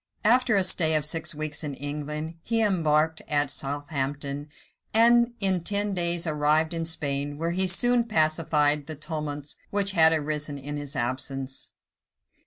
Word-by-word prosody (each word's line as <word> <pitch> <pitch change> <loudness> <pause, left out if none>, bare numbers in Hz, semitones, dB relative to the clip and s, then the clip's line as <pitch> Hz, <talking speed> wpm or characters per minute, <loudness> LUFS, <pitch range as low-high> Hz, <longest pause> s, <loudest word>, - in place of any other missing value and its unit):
After 240 0 +4
a 195 - +3
stay 165 -4 +4
of 150 -1 +2
six 160 +1 -1
weeks 155 0 -3
in 145 -2 -4
England, 150 +3 -5
he 230 +5 -1
embarked 160 -6 +1
at 145 -2 +1
Southampton, 145 0 -4 0.5
and 235 +1 +5
in 190 -4 0
ten 205 +1 -1
days 170 -1 0
arrived 155 +1 +1
in 165 -1 -3
Spain, 145 -2 -3
where 165 +2 -2
he 185 +2 +1
soon 245 +5 +4
pacified 155 -6 +1
the 155 - -6
tumults 150 -1 -5
which 200 0 0
had 160 -4 +5
arisen 150 -2 -1
in 145 +2 -6
his 145 0 -8
absence. 135 +2 -3
155 Hz, 150 wpm, -26 LUFS, 145-180 Hz, 0.5 s, and